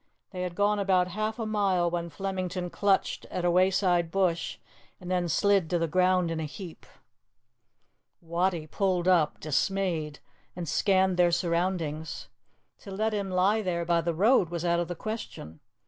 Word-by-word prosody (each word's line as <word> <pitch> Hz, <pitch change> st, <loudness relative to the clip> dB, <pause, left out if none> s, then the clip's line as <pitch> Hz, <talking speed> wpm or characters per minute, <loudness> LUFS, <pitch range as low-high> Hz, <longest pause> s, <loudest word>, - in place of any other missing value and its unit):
They 185 Hz, -2 st, -5 dB
had 180 Hz, -1 st, -4 dB
gone 205 Hz, +1 st, +2 dB
about 185 Hz, -2 st, +2 dB
half 215 Hz, +3 st, -3 dB
a 225 Hz, -, -3 dB
mile 195 Hz, -5 st, +1 dB
when 170 Hz, 0 st, -3 dB
Flemington 185 Hz, +1 st, -4 dB
clutched 200 Hz, -1 st, 0 dB
at 180 Hz, -, -4 dB
a 175 Hz, -, +3 dB
wayside 180 Hz, -1 st, +2 dB
bush 175 Hz, -2 st, 0 dB, 0.4 s
and 180 Hz, 0 st, -7 dB
then 180 Hz, -1 st, 0 dB
slid 195 Hz, 0 st, +2 dB
to 175 Hz, -, +1 dB
the 165 Hz, 0 st, 0 dB
ground 180 Hz, +1 st, +2 dB
in 165 Hz, -, -2 dB
a 160 Hz, -, -2 dB
heap. 165 Hz, +3 st, -10 dB, 1.3 s
Wattie 170 Hz, 0 st, -1 dB
pulled 185 Hz, +1 st, 0 dB
up, 170 Hz, -5 st, +3 dB
dismayed, 155 Hz, 0 st, -1 dB, 0.4 s
and 175 Hz, -2 st, -5 dB
scanned 190 Hz, +1 st, +2 dB
their 175 Hz, -1 st, +4 dB
surroundings. 170 Hz, -3 st, -2 dB, 0.5 s
To -, -, -12 dB
let 215 Hz, +3 st, -1 dB
him 200 Hz, -2 st, -2 dB
lie 190 Hz, +4 st, +2 dB
there 170 Hz, -4 st, -2 dB
by 170 Hz, 0 st, +2 dB
the 165 Hz, 0 st, -2 dB
road 200 Hz, 0 st, +4 dB
was 170 Hz, 0 st, -4 dB
out 170 Hz, 0 st, +2 dB
of 175 Hz, -, -1 dB
the 175 Hz, -, -5 dB
question. 165 Hz, -, -7 dB
180 Hz, 165 wpm, -28 LUFS, 170-195 Hz, 1.3 s, their